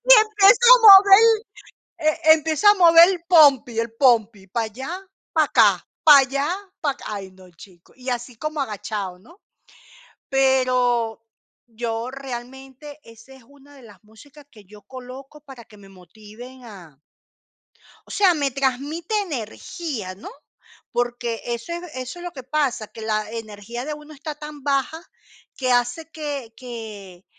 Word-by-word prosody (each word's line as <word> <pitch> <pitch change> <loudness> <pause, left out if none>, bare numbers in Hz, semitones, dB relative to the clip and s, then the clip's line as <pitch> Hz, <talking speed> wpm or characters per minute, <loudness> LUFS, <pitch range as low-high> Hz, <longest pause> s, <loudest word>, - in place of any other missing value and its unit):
Y - - +8
empiezo 430 +3 +6
a - - +2
mover 395 -1 +9
el 450 -1 +3 0.6
e 315 0 +3
empiezo 315 +4 0
a 410 - +8
mover 340 -1 +7
el 355 -3 -4
pompi, 275 -9 +4
el 230 0 -4
pompi, 225 -6 +1
para 225 +4 -2
allá, 260 +7 -8 0.4
para - - +3
acá, - - +2 0.2
para 295 -3 +8
allá, 275 +3 -1 0.3
para 285 -3 -1
acá, - - -15
ay, 195 -2 -7
no, 185 -1 -18
chico. 175 +1 -18
Y 255 0 -8
así 245 0 -5
como 305 +1 -5
agachado, 205 -5 -5
¿no? 335 - -20 0.9
Pero 255 -4 0 0.4
yo 230 +1 -5
realmente 265 +2 -10
esa 230 +3 -17
es 265 - -18
una 285 0 -20
de 265 - -17
las 215 -2 -17
músicas 285 +7 -18
que 215 -6 -18
yo 210 +1 -16
coloco 265 +3 -12
para 265 -5 -14
que 210 - -19
me 195 -1 -16
motiven 215 +7 -15
a 180 -10 -14 1.1
o - - -13
sea, 385 -4 +3
me 285 -4 -2
transmite 275 - -3
energía, 265 - -6
¿no? 200 - -11 0.6
Porque 240 -1 -3
eso 235 +6 -5
es 345 +1 -6
eso 255 +6 -7
es 350 - -10
lo 350 - -6
que 260 -3 -10
pasa, 260 -6 -2
que 225 - -13
la 215 -1 -2
energía 225 +2 -8
de 300 - -4
uno 300 +1 -14
está 300 +1 -8
tan 300 -1 -11
baja 280 +3 -2 0.6
que 255 -2 -1
hace 245 +7 -1
que 285 -7 -7
que 215 -7 -10
260 Hz, 160 wpm, -21 LUFS, 225-300 Hz, 1.1 s, mover